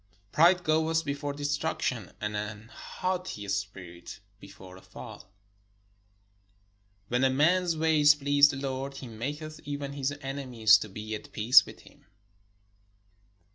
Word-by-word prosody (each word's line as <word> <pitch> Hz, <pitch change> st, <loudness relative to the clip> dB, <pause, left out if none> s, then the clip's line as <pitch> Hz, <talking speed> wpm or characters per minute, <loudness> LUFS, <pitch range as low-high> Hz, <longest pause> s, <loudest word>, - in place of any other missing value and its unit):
Pride 175 Hz, +3 st, +4 dB
goeth 160 Hz, 0 st, +1 dB
before 145 Hz, 0 st, -3 dB
destruction, 145 Hz, -, -2 dB
and 105 Hz, 0 st, -3 dB
an 105 Hz, +2 st, -6 dB
haughty 180 Hz, -, -5 dB
spirit 95 Hz, -2 st, -6 dB, 0.2 s
before 95 Hz, -2 st, -13 dB
a 95 Hz, -, -14 dB
fall. 105 Hz, +2 st, -12 dB, 1.8 s
When 125 Hz, +2 st, +1 dB
a 135 Hz, -, +5 dB
man's 165 Hz, +5 st, +2 dB
ways 155 Hz, -2 st, +5 dB
please 145 Hz, 0 st, +4 dB
the 135 Hz, -, -4 dB
Lord, 135 Hz, 0 st, -4 dB
he 135 Hz, -, -8 dB
maketh 150 Hz, +7 st, -6 dB
even 145 Hz, -1 st, -5 dB
his 140 Hz, -1 st, -2 dB
enemies 125 Hz, -6 st, +3 dB
to 110 Hz, -, -6 dB
be 110 Hz, +3 st, -7 dB
at 105 Hz, -, -7 dB
peace 115 Hz, +4 st, +6 dB
with -, -, -12 dB
him. -, -, -21 dB
135 Hz, 130 wpm, -28 LUFS, 105-150 Hz, 1.8 s, peace